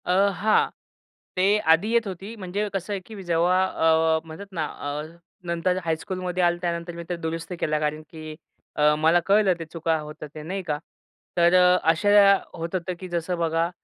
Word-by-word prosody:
अ, 195 Hz, +3 st, +3 dB
हां, 215 Hz, +4 st, +2 dB, 0.7 s
ते 195 Hz, +3 st, +4 dB, 0.2 s
आधी 180 Hz, +7 st, 0 dB
येत 235 Hz, -2 st, +2 dB
होती. 195 Hz, +4 st, -7 dB
म्हणजे 200 Hz, +1 st, -3 dB
कसं 195 Hz, +1 st, -3 dB
आहे 200 Hz, -, -2 dB
की 215 Hz, -3 st, -9 dB
जेव्हा 175 Hz, +2 st, +2 dB
अ, 160 Hz, -2 st, +2 dB
म्हणतात 160 Hz, +5 st, -9 dB
ना, 165 Hz, -4 st, -2 dB
अ, 145 Hz, +1 st, -5 dB, 0.4 s
नंतर 170 Hz, +2 st, 0 dB
हायस्कूलमध्ये 180 Hz, +2 st, -2 dB
आलं. 175 Hz, 0 st, +3 dB
त्यानंतर 170 Hz, 0 st, -3 dB
मी 170 Hz, -, -6 dB
ते 175 Hz, -, -1 dB
दुरुस्त 165 Hz, +1 st, -4 dB
केला 150 Hz, 0 st, 0 dB
कारण 150 Hz, 0 st, -2 dB
की 155 Hz, -1 st, -8 dB, 0.4 s
अ, 150 Hz, 0 st, +4 dB
मला 160 Hz, +3 st, +4 dB
कळलं 200 Hz, -1 st, +4 dB
ते 165 Hz, -, -5 dB
चुका 165 Hz, 0 st, -1 dB
होत 150 Hz, 0 st, -8 dB
आहेत 150 Hz, 0 st, -9 dB
आहे, 155 Hz, -, -7 dB
नाही 195 Hz, +2 st, -3 dB
का? 150 Hz, -4 st, -2 dB, 0.6 s
तर 170 Hz, 0 st, +5 dB
अ, 180 Hz, 0 st, +6 dB
अशा 200 Hz, +3 st, +5 dB, 0.2 s
होत 165 Hz, +2 st, -5 dB
होतं 185 Hz, 0 st, -2 dB
की 185 Hz, -, -7 dB
जसं 175 Hz, +1 st, -2 dB
बघा, 165 Hz, 0 st, 0 dB
175 Hz, 185 wpm, -24 LUFS, 160-190 Hz, 0.7 s, अ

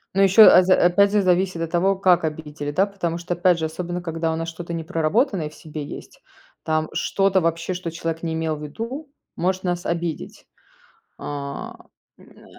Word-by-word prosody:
Но 195 Hz, -, +3 dB
еще, 195 Hz, +3 st, +7 dB
а 185 Hz, -, +9 dB
за 185 Hz, 0 st, +4 dB
опять 195 Hz, +3 st, +4 dB
зе 210 Hz, -1 st, +3 dB
зависит 185 Hz, -1 st, +1 dB
от 165 Hz, -1 st, -3 dB
того, 190 Hz, +3 st, +2 dB
как 185 Hz, -3 st, +3 dB
обидели, 150 Hz, -2 st, -4 dB
да. 190 Hz, +6 st, +2 dB
Потому 185 Hz, -5 st, -3 dB
что, 175 Hz, +1 st, -3 dB
опять 175 Hz, 0 st, +3 dB
же, 160 Hz, -, -1 dB
особенно 175 Hz, +2 st, -4 dB
когда 165 Hz, -1 st, -2 dB
у -, -, -2 dB
нас 165 Hz, 0 st, -4 dB
что-то 170 Hz, +1 st, -7 dB
непроработанное 165 Hz, -, 0 dB
в 155 Hz, -, -17 dB
себе 155 Hz, -1 st, -7 dB
есть, -, -, -10 dB, 0.4 s
там 155 Hz, 0 st, -1 dB
что-то 195 Hz, -1 st, +1 dB
вообще, 165 Hz, +2 st, -1 dB
что 180 Hz, -1 st, -5 dB
человек 165 Hz, 0 st, -4 dB
не 165 Hz, -1 st, -3 dB
имел 160 Hz, -1 st, -1 dB
в 150 Hz, -, -9 dB
виду, 235 Hz, -, -6 dB, 0.2 s
может 185 Hz, +2 st, -1 dB
нас 175 Hz, 0 st, -2 dB
обидеть. 170 Hz, -2 st, -4 dB, 0.7 s
А. 140 Hz, -1 st, -6 dB, 0.4 s
М, -, -, -18 dB
н -, -, -19 dB
170 Hz, 190 wpm, -22 LUFS, 160-185 Hz, 0.7 s, а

